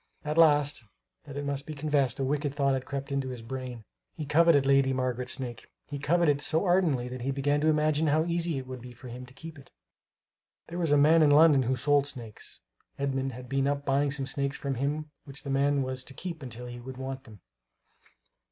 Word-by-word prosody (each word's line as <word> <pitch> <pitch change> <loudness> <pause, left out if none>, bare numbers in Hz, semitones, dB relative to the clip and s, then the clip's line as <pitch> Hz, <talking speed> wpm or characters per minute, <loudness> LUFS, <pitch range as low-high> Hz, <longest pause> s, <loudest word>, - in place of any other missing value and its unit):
Alas, 150 -3 +3 0.4
that 145 -1 -8
it 145 - -3
must 140 0 -3
be 155 - -5
confessed, 145 -3 +1
a - - 0
wicked 145 +1 -1
thought 140 -2 +2
had 130 -1 -2
crept 140 0 -5
into 135 -1 -1
his 125 -3 -7
brain. 125 -1 -6 0.3
He 155 - -5
coveted 155 -1 +4
Lady 135 -1 +4
Margaret's 125 -1 -1
snake. 125 -4 -6 0.2
He 145 - -6
coveted 155 0 +3
it - - -9
so 160 +5 +1
ardently 170 -9 +2
that 125 0 -6
he 130 - -2
began 145 +2 +1
to 155 - +2
imagine 155 0 +2
how 155 +2 +3
easy 170 -2 -1
it 130 - -5
would 130 -1 -8
be 125 0 -10
for 120 +1 -11
him 125 +1 -8
to 125 - -16
keep 160 0 -10
it. 135 - -16 1.0
There 175 +1 -5
was 165 -4 +1
a 145 - +6
man 155 +3 +6
in 150 - +6
London 145 -1 +6
who 130 +1 0
sold 145 +1 +2
snakes. 120 -6 -6 0.4
Edmund 135 -1 -1
had 125 +1 -9
been 135 +1 0
up 140 0 -1
buying 140 +1 +2
some 140 -1 -1
snakes 140 0 -2
from 140 -1 -3
him 145 +4 -2
which 140 +1 -9
the 140 - -4
man 140 0 +2
was 130 0 -3
to 135 - -8
keep 170 -4 -6
until 125 -2 -7
he 120 0 -7
should 130 +1 -9
want 130 0 -6
them. 105 -6 -14
140 Hz, 220 wpm, -28 LUFS, 130-150 Hz, 1.0 s, a